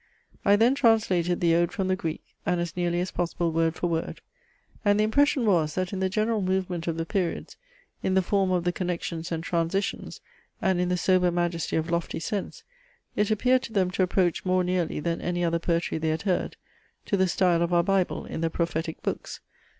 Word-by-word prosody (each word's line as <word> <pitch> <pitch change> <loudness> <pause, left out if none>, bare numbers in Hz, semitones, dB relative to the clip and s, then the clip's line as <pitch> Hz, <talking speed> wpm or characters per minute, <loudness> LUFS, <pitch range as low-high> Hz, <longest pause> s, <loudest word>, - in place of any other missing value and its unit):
I 200 - +5
then 230 +5 +4
translated 210 -9 +2
the 170 -1 +4
ode 170 +1 +2
from 190 +1 -2
the 185 - +2
Greek, 165 -4 -4 0.2
and 180 -1 0
as 170 -2 -3
nearly 175 -1 0
as 180 - -3
possible, 170 -1 -1
word 165 0 +1
for - - -3
word; 165 -1 -2 0.6
and 205 -1 +3
the - - +4
impression 270 +3 +3
was, 165 -7 +2
that 185 +1 -2
in 190 - -2
the 190 0 +1
general 215 +2 0
movement 185 -2 -1
of 165 -1 -1
the 165 - -2
periods, 180 -2 -2 0.5
in 190 - 0
the 190 - +4
form 195 +1 +1
of 180 -2 +1
the 175 - +1
connections 175 -2 -4
and 165 -1 -2
transitions, 170 +3 -2 0.4
and 190 -2 +1
in 180 - 0
the 180 - +1
sober 180 0 +3
majesty 175 -1 -1
of 160 +1 -1
lofty 170 -1 -1
sense, 200 +4 -4 0.5
it 210 0 +1
appeared 250 +4 +3
to 230 - -8
them 185 -4 +2
to 190 - -1
approach 180 -1 +1
more 185 0 +2
nearly, 180 -3 -1
than 170 +2 -2
any 175 0 -1
other 170 0 +1
poetry 170 -1 -1
they 160 0 0
had 160 +2 -1
heard, 190 -3 -1 0.5
to - - 0
the 190 -1 +3
style 175 -1 +2
of 170 0 0
our 170 -1 +4
Bible, 195 0 0
in - - -5
the 165 - +1
prophetic 165 -1 -3
books. - - -4
180 Hz, 210 wpm, -26 LUFS, 170-190 Hz, 0.6 s, I